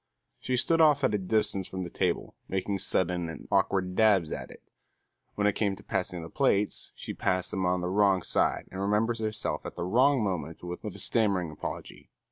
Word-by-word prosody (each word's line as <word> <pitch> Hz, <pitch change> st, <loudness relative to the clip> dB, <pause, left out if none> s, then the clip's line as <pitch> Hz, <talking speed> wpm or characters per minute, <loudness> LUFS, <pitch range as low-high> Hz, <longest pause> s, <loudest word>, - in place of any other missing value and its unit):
She 125 Hz, 0 st, -1 dB
stood 165 Hz, +6 st, +3 dB
off 150 Hz, -3 st, +5 dB
at 130 Hz, -, +3 dB
a 105 Hz, -, +1 dB
distance 100 Hz, -1 st, 0 dB
from 95 Hz, 0 st, -5 dB
the 85 Hz, -, -6 dB
table -, -, -1 dB
making 95 Hz, +1 st, -2 dB
sudden 90 Hz, -3 st, 0 dB
and 80 Hz, -, -9 dB
awkward 95 Hz, -2 st, +1 dB
dabs 100 Hz, -7 st, +4 dB
at -, -, -5 dB
it. -, -, -14 dB, 0.7 s
When 100 Hz, -, 0 dB
it 105 Hz, -, +4 dB
came 100 Hz, -2 st, 0 dB
to -, -, -14 dB
passing 90 Hz, -2 st, -2 dB
the 80 Hz, -, -8 dB
plates, 105 Hz, -7 st, +1 dB
she -, -, -6 dB
passed 90 Hz, 0 st, 0 dB
them 95 Hz, -1 st, 0 dB
on 90 Hz, 0 st, +1 dB
the 90 Hz, -, -2 dB
wrong 95 Hz, -1 st, +3 dB
side -, -, 0 dB
and 95 Hz, -, -5 dB
remembered 110 Hz, +3 st, +1 dB
herself 110 Hz, -1 st, -2 dB
at -, -, -7 dB
the -, -, -4 dB
wrong 130 Hz, +5 st, +3 dB
moment 85 Hz, -5 st, -3 dB
with 90 Hz, 0 st, -6 dB
a -, -, -4 dB
stammering 100 Hz, -7 st, +1 dB
apology. 75 Hz, -, -7 dB
95 Hz, 200 wpm, -28 LUFS, 90-110 Hz, 0.7 s, off